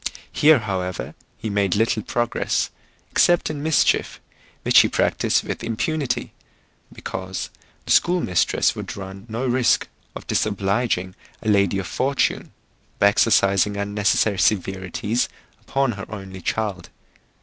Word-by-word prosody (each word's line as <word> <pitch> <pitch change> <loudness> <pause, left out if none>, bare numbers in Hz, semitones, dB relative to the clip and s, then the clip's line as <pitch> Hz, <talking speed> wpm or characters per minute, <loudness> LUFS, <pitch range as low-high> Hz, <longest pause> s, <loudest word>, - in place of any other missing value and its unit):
Here, 155 0 +5
however, 95 -5 -4 0.2
he 110 - -4
made 100 -3 +1
little 110 +1 +1
progress, 120 +2 -1 0.4
except 175 -2 +3
in 145 -2 -5
mischief, 160 0 +2 0.4
which - - +6
he - - +6
practised - - +1
with - - -5
impunity, 125 +2 -2 0.6
because 95 0 -6 0.3
the - - -3
school 180 +1 +4
mistress 90 - +1
would - - -6
run 95 +2 -9
no 115 +4 -3
risk 125 -1 +2 0.3
of - - -8
disobliging 100 -2 0 0.3
a 110 - 0
lady 100 -2 +3
of 95 - -3
fortune, 135 +7 -1 0.5
by 100 - +5
exercising 100 -1 +3
unnecessary 100 0 +1
severities 95 +3 0 0.3
upon 135 -2 0
her 100 -3 -7
only 95 -3 -8
child. 100 -4 -3
105 Hz, 125 wpm, -22 LUFS, 95-120 Hz, 0.6 s, which